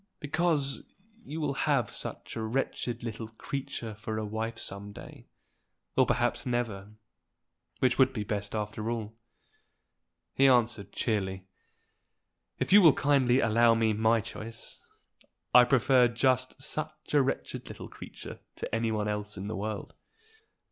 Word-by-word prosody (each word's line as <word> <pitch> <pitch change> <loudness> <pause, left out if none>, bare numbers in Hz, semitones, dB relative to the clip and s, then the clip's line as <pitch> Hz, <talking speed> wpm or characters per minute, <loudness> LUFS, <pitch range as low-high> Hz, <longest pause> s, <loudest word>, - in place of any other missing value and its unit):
"Because 150 -2 0 0.4
you 160 -4 -6
will 150 -3 0
have 135 -6 +1
such - - -4
a 115 - -3
wretched 120 0 -2
little 115 -1 -5
creature 120 0 -5
for 110 +1 -5
a 110 - -2
wife 110 +2 -3
some 100 -1 -5
day, - - -12 0.7
or - - +4
perhaps - - +1
never, 110 -5 -2 0.8
which 130 0 +2
would 130 0 +6
be 110 -5 -3
best 100 0 -3
after 105 +1 -3
all." 110 -2 -3 1.2
He 135 - +5
answered 120 -5 +3
cheerily. 95 -4 -1 1.1
"If - - 0
you 205 - +10
will 160 -6 +8
kindly 135 -3 +3
allow 115 +1 +5
me 110 -1 +2
my 110 +1 +3
choice, 115 0 -7 0.7
I 125 0 +9
prefer 125 0 +5
just 130 +2 +1
such 150 +3 -5
a 145 - +6
wretched 135 - -2
little - - -8
creature - - -10 0.2
to - - -6
any 115 0 +1
one 105 -1 -1
else 105 0 -3
in 95 +1 -5
the 110 - -3
world." 105 +1 -4
115 Hz, 140 wpm, -29 LUFS, 110-130 Hz, 1.2 s, you